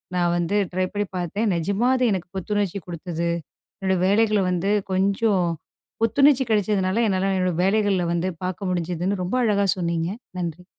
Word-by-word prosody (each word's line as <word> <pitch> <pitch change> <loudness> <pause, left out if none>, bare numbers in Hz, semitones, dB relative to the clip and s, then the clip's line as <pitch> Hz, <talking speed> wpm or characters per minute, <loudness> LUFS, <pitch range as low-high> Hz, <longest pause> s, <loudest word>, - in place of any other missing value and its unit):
நான் 175 -1 +2
வந்து 175 +3 -1 0.2
ட்ரை 185 0 +1
பண்ணி 205 0 -1
பார்த்தேன். 200 +5 -1
நிஜமா 200 +8 0
அது 255 - 0
எனக்கு 180 -2 -4
புத்துணர்ச்சி 200 0 -1
கொடுத்தது. 170 0 -3 0.5
என்னுடைய 190 -2 0
வேலைகளை 215 +1 +3
வந்து 180 +2 0 0.2
கொஞ்சம் 195 0 +2 0.6
புத்துணர்ச்சி 265 +4 +4
கிடைச்சதுனால 205 0 +1
என்னால் 195 -1 +1
என்னோட 185 -1 +1
வேலைகளில் 195 -3 +2
வந்து 175 +2 0 0.2
பார்க்க 185 +1 -3
முடிஞ்சுதுன்னு." 180 +2 -1
ரொம்ப 195 +8 -2
அழகா 200 -2 +2
சொன்னிங்க. 170 -1 -1 0.3
நன்றி. 175 0 -4
190 Hz, 145 wpm, -23 LUFS, 175-205 Hz, 0.6 s, புத்துணர்ச்சி